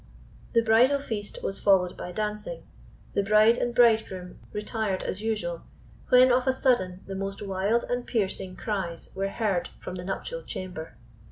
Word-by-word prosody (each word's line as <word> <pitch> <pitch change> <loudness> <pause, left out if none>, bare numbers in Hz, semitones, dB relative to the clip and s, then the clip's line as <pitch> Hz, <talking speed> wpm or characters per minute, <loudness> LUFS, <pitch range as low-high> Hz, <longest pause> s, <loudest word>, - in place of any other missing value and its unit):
The 230 -1 +4
bridal 235 +5 +5
feast 220 -7 -5
was 195 - -2
followed 185 -3 +3
by 180 - -6
dancing. 210 - -4 0.5
The - - +2
bride 215 +3 +5
and 240 -1 -1
bridegroom 220 -6 +2
retired 210 -2 -2
as 195 - -4
usual, 210 -7 -2 0.5
when 255 0 +7
of 250 +1 +2
a 260 - +4
sudden 190 -9 +1
the 195 - -6
most 195 +1 -4
wild 200 +4 +1
and 245 0 -1
piercing 190 -4 -1
cries 190 -7 -4
were 195 +1 -1
heard 200 -4 -1
from - - -7
the 180 -1 -6
nuptial 440 - -4
chamber. 170 - -7
210 Hz, 160 wpm, -27 LUFS, 185-235 Hz, 0.5 s, when